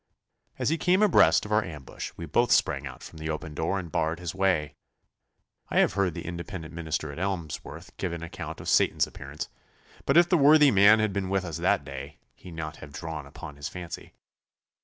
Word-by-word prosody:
As -, -, 0 dB
he 160 Hz, +1 st, 0 dB
came 185 Hz, +4 st, +3 dB
abreast 205 Hz, -, +5 dB
of 105 Hz, -, -8 dB
our 105 Hz, 0 st, +3 dB
ambush 75 Hz, -7 st, -7 dB
we -, -, -5 dB
both -, -, +2 dB
sprang 70 Hz, 0 st, +2 dB
out 65 Hz, -, -10 dB
from 80 Hz, -, -11 dB
the 80 Hz, 0 st, -4 dB
open 80 Hz, 0 st, -4 dB
door 80 Hz, +6 st, -1 dB
and 85 Hz, -4 st, -6 dB
barred 80 Hz, +3 st, 0 dB
his 90 Hz, -1 st, -4 dB
way. 90 Hz, -6 st, +1 dB, 1.0 s
I -, -, -1 dB
have -, -, +4 dB
heard 95 Hz, -4 st, 0 dB
the -, -, -6 dB
Independent 85 Hz, -1 st, -6 dB
minister 80 Hz, -2 st, -3 dB
at 70 Hz, -, -8 dB
Emsworth 90 Hz, -6 st, -5 dB
give 90 Hz, -, -2 dB
an 85 Hz, -1 st, -5 dB
account 85 Hz, -, -7 dB
of -, -, -8 dB
Satan's -, -, +3 dB
appearance, 75 Hz, +5 st, -7 dB, 0.6 s
but 140 Hz, -, +4 dB
if 175 Hz, 0 st, +7 dB
the 175 Hz, -2 st, +3 dB
worthy 150 Hz, 0 st, +7 dB
man 100 Hz, +2 st, +7 dB
had 110 Hz, -2 st, 0 dB
been 95 Hz, -1 st, -2 dB
with 95 Hz, -1 st, 0 dB
us 85 Hz, -3 st, -4 dB
that 70 Hz, -, +2 dB
day, 70 Hz, +1 st, -8 dB, 0.2 s
he -, -, -13 dB
need 85 Hz, -, -10 dB
not 80 Hz, -1 st, -4 dB
have 75 Hz, -, -11 dB
drawn 75 Hz, -1 st, -6 dB
upon 70 Hz, 0 st, -10 dB
his 70 Hz, +2 st, -5 dB
fancy. 90 Hz, -2 st, -8 dB
85 Hz, 210 wpm, -27 LUFS, 75-100 Hz, 1.0 s, if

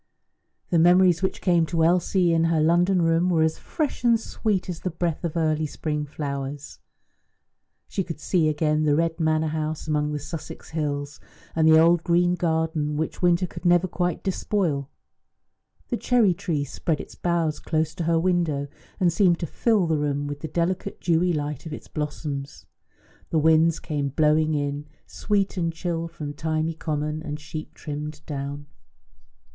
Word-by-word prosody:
The 170 Hz, -, +4 dB
memories 175 Hz, +1 st, +5 dB
which 190 Hz, -, -1 dB
came 170 Hz, -3 st, +3 dB
to 165 Hz, +1 st, +1 dB
Elsie 175 Hz, +1 st, +3 dB
in 165 Hz, 0 st, +3 dB
her 165 Hz, -1 st, +2 dB
London 175 Hz, +3 st, +3 dB
room 165 Hz, +2 st, +2 dB
were 165 Hz, -3 st, +3 dB
as 160 Hz, 0 st, 0 dB
fresh 305 Hz, -6 st, -3 dB
and 235 Hz, -2 st, +4 dB
sweet 210 Hz, -4 st, -2 dB
as 175 Hz, -3 st, -5 dB
the 185 Hz, -, -2 dB
breath 170 Hz, 0 st, -2 dB
of 170 Hz, -1 st, -2 dB
early 155 Hz, -1 st, +1 dB
spring 150 Hz, 0 st, -3 dB
flowers. 140 Hz, -1 st, -5 dB, 1.1 s
She 195 Hz, -, -2 dB
could 165 Hz, -3 st, -7 dB
see 160 Hz, -1 st, +2 dB
again 155 Hz, 0 st, +1 dB
the 150 Hz, -1 st, +3 dB
red 165 Hz, +1 st, 0 dB
manor 160 Hz, -1 st, +1 dB
house 155 Hz, 0 st, -3 dB
among 150 Hz, -1 st, 0 dB
the 150 Hz, -, -2 dB
Sussex 150 Hz, +2 st, -8 dB
hills, 145 Hz, -2 st, -3 dB, 0.4 s
and 160 Hz, -1 st, +3 dB
the 160 Hz, 0 st, +7 dB
old 165 Hz, +1 st, +5 dB
green 175 Hz, 0 st, +3 dB
garden 160 Hz, -3 st, 0 dB
which 160 Hz, 0 st, -3 dB
winter 175 Hz, 0 st, +3 dB
could -, -, -9 dB
never 175 Hz, 0 st, +4 dB
quite 180 Hz, -2 st, -2 dB
despoil. 180 Hz, -7 st, -1 dB, 1.0 s
The 240 Hz, -, 0 dB
cherry 230 Hz, -7 st, +3 dB
tree 170 Hz, -5 st, -2 dB
spread 150 Hz, +3 st, -2 dB
its -, -, -8 dB
boughs 170 Hz, -3 st, 0 dB
close 155 Hz, 0 st, -1 dB
to 170 Hz, -, -4 dB
her 165 Hz, 0 st, +3 dB
window, 165 Hz, -5 st, 0 dB, 0.3 s
and 175 Hz, -3 st, +3 dB
seemed 175 Hz, -2 st, +4 dB
to -, -, 0 dB
fill 210 Hz, -, +1 dB
the 160 Hz, -2 st, +1 dB
room 145 Hz, -1 st, -1 dB
with 145 Hz, 0 st, -5 dB
the 160 Hz, -, -5 dB
delicate 180 Hz, +4 st, -2 dB
dewy 175 Hz, +1 st, +2 dB
light 150 Hz, -1 st, -3 dB
of 155 Hz, -, -6 dB
its -, -, -8 dB
blossoms; 145 Hz, -2 st, -5 dB, 0.6 s
the 165 Hz, -, 0 dB
winds 160 Hz, +1 st, +4 dB
came 145 Hz, -2 st, -2 dB
blowing 155 Hz, +2 st, +2 dB
in, 145 Hz, 0 st, -2 dB, 0.2 s
sweet 200 Hz, -2 st, -1 dB
and 165 Hz, -2 st, 0 dB
chill, 165 Hz, 0 st, -3 dB
from 150 Hz, -3 st, -7 dB
thymy 155 Hz, +1 st, -1 dB
common 150 Hz, -1 st, -3 dB
and 150 Hz, -2 st, -5 dB
"sheep 155 Hz, +1 st, -8 dB
trimmed 150 Hz, 0 st, -6 dB
down." 145 Hz, 0 st, -5 dB
160 Hz, 170 wpm, -25 LUFS, 150-175 Hz, 1.1 s, the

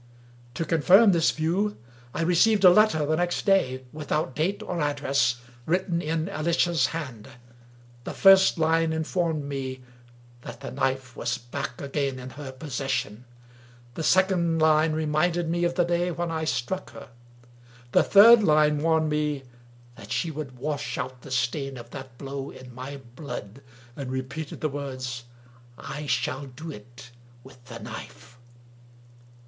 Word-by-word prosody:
To 165 Hz, -, -2 dB
confirm 185 Hz, +7 st, +6 dB
this 170 Hz, -3 st, +3 dB
view 180 Hz, +7 st, 0 dB, 0.3 s
I 165 Hz, -, -2 dB
Teceived 200 Hz, +5 st, +3 dB
a 180 Hz, -, +10 dB
letter 180 Hz, -6 st, +4 dB
the 155 Hz, +2 st, +1 dB
next 175 Hz, +1 st, -1 dB
day, 130 Hz, -11 st, +2 dB
without 150 Hz, -3 st, -2 dB
date 180 Hz, +6 st, -1 dB
or 180 Hz, -, -4 dB
address^ 140 Hz, -5 st, +1 dB, 0.3 s
written 175 Hz, 0 st, 0 dB
in 160 Hz, 0 st, -2 dB
Alicia's 170 Hz, -4 st, +1 dB
hand. 130 Hz, -10 st, -6 dB, 0.8 s
The -, -, -4 dB
first 195 Hz, -2 st, +6 dB
line 160 Hz, 0 st, +2 dB
informed 160 Hz, -1 st, -1 dB
me 135 Hz, -2 st, -5 dB, 0.6 s
that -, -, -10 dB
the -, -, -6 dB
knife 130 Hz, -, -2 dB
was 120 Hz, 0 st, -2 dB
back 120 Hz, 0 st, -6 dB
again 140 Hz, -1 st, -2 dB
in 130 Hz, 0 st, -8 dB
her 140 Hz, -2 st, -8 dB
possession. 130 Hz, -5 st, -3 dB, 0.7 s
The 160 Hz, -, -5 dB
second 180 Hz, -1 st, +3 dB
line 155 Hz, 0 st, +4 dB
reminded 160 Hz, +2 st, 0 dB
me 170 Hz, +1 st, 0 dB
of 175 Hz, 0 st, -1 dB
the 175 Hz, -, +3 dB
day 175 Hz, +1 st, 0 dB
when 170 Hz, 0 st, -3 dB
I 160 Hz, -1 st, -2 dB
struck 160 Hz, +5 st, -2 dB
her. -, -, -11 dB, 0.8 s
The -, -, +5 dB
third 225 Hz, +3 st, +8 dB
line 150 Hz, -4 st, +3 dB
warned 160 Hz, -1 st, +2 dB
me 150 Hz, -2 st, -1 dB, 0.5 s
that -, -, -11 dB
she 165 Hz, -, -1 dB
would 140 Hz, -4 st, -7 dB
wash 145 Hz, +2 st, -3 dB
out 130 Hz, -1 st, -5 dB
the -, -, -11 dB
stain 135 Hz, +2 st, -1 dB
of 120 Hz, 0 st, -11 dB
that 130 Hz, -2 st, -9 dB
blow 140 Hz, 0 st, -6 dB
in 125 Hz, -1 st, -12 dB
my 130 Hz, +3 st, -7 dB, 0.2 s
blood, 125 Hz, -4 st, -7 dB, 0.3 s
and 135 Hz, -3 st, -6 dB
repeated 140 Hz, +4 st, -5 dB
the 155 Hz, -, 0 dB
words, 130 Hz, -4 st, -5 dB, 0.3 s
" 120 Hz, -1 st, -26 dB
I 140 Hz, +2 st, -7 dB
shall 130 Hz, +2 st, -1 dB
do 155 Hz, +6 st, -8 dB
it 120 Hz, +1 st, -13 dB, 0.3 s
with 130 Hz, -2 st, -16 dB
the -, -, -9 dB
knife!" 120 Hz, -, -10 dB
150 Hz, 155 wpm, -26 LUFS, 130-165 Hz, 0.8 s, a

